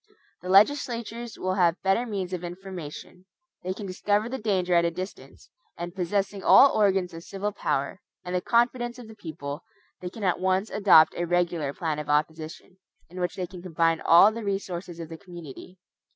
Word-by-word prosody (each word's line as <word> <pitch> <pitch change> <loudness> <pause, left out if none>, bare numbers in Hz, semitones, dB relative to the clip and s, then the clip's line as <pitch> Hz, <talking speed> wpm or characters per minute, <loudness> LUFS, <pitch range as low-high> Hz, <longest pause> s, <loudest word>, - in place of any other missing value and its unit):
The 180 - -7
legislatures 235 +1 +2
will 185 0 -1
have 175 -2 +2
better 195 +6 +2
means 190 -4 -4
of 180 -1 -4
information. 180 -1 -8 0.4
They 185 - -3
can 200 +2 -6
discover 205 +3 0
the 260 +2 -4
danger 190 -5 0
at 170 0 +5
a 170 - +2
distance; 185 +3 -9 0.3
and 175 0 -6
possessing 195 +2 -2
all 275 - +8
the - - -4
organs 195 -4 +2
of 165 0 -9
civil 200 +3 -4
power, 140 -4 -2 0.2
and 180 - -5
the 180 - 0
confidence 240 +2 +1
of 245 -3 -10
the 220 - -11
people, 155 -6 -7 0.4
they 180 - -5
can 215 +3 -9
at 180 -2 +1
once 190 +3 0
adopt 195 -6 +6
a 175 - -2
regular 175 -4 0
plan 155 0 -3
of 150 - -6
opposition, 160 +4 -2 0.3
in 180 - -8
which 180 0 -2
they 185 - -3
can 180 -1 -11
combine 165 -2 +1
all 175 +5 +7
the 230 +1 -6
resources 185 -3 -4
of 165 - -6
the 165 -1 -9
community. 175 -1 -11
185 Hz, 190 wpm, -26 LUFS, 170-205 Hz, 0.4 s, all